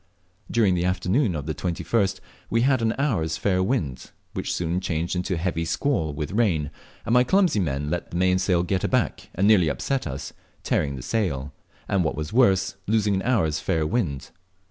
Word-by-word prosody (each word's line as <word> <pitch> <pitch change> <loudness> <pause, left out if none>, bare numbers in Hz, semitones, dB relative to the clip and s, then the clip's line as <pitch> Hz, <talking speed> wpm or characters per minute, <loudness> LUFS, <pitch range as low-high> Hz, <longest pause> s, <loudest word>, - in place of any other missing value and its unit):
During 110 -5 +3
the 90 -1 0
afternoon 90 - +1
of 75 -2 -4
the 80 - -2
21st 95 +4 -1 0.3
we 115 - +2
had 130 0 +3
an 115 0 +1
hour's 100 - 0
fair 95 -2 +1
wind, 90 - -2 0.2
which - - -3
soon 85 +1 -1
changed 85 0 -2
into 90 +1 -1
a - - -3
heavy 85 -1 -1
squall 85 - 0
with 75 0 -4
rain, 90 -10 +1 0.3
and 115 - 0
my 125 0 +6
clumsy 180 - +3
men 75 -4 -1
let 90 - -3
the 85 - -4
mainsail 90 -1 +2
get 95 +1 -1
taken - - -1
aback - - -1
and 95 +3 +2
nearly 100 -6 +5
upset 135 - -2
us, 70 -2 -6 0.3
tearing 70 -2 0
the 65 - -7
sail; 70 -7 -2 0.3
and, 95 -2 +1
what 75 - -1
was 75 +3 -5
worse, 95 -6 +3
losing 105 -1 +2
an 95 - 0
hour's 95 -11 +1
fair 80 0 0
wind. 75 - -2
90 Hz, 190 wpm, -24 LUFS, 80-110 Hz, 0.3 s, my